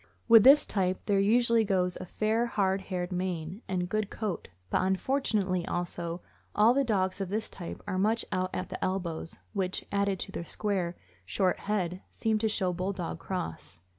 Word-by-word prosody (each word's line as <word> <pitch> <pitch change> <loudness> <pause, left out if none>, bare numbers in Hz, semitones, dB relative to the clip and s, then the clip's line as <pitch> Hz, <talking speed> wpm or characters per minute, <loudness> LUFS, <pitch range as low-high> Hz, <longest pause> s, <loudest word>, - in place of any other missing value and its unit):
With 225 -3 +9
this 275 +4 +8
type 185 -2 0
there 200 -2 +2
usually 230 +3 +4
goes 185 -3 +1
a - - -7
fair, 220 +5 +1
hard 195 -4 +1
haired 180 -1 -4
mane 180 +1 -3
and 180 -2 -1
good 215 +2 -1
coat; 210 -5 -4 0.2
but - - +3
unfortunately, 190 -2 +1
also, 175 0 -3 0.3
all 215 +3 +6
the 275 +1 +3
dogs 195 -5 0
of 190 - -2
this 215 +3 -1
type 175 -3 -8
are 185 -2 -2
much 220 +4 +2
out 185 -1 0
at 185 - -4
the - - -5
elbows, 175 -4 -2 0.2
which, 190 -2 -2
added 200 -1 +1
to - - -4
their - - -4
square, 185 -2 -2 0.3
short 185 - 0
head, 185 -3 -2
seems 220 -1 0
to 220 - +2
show 185 -4 0
Bulldog 180 -2 -3
cross. 125 - -5
190 Hz, 175 wpm, -29 LUFS, 180-215 Hz, 0.3 s, With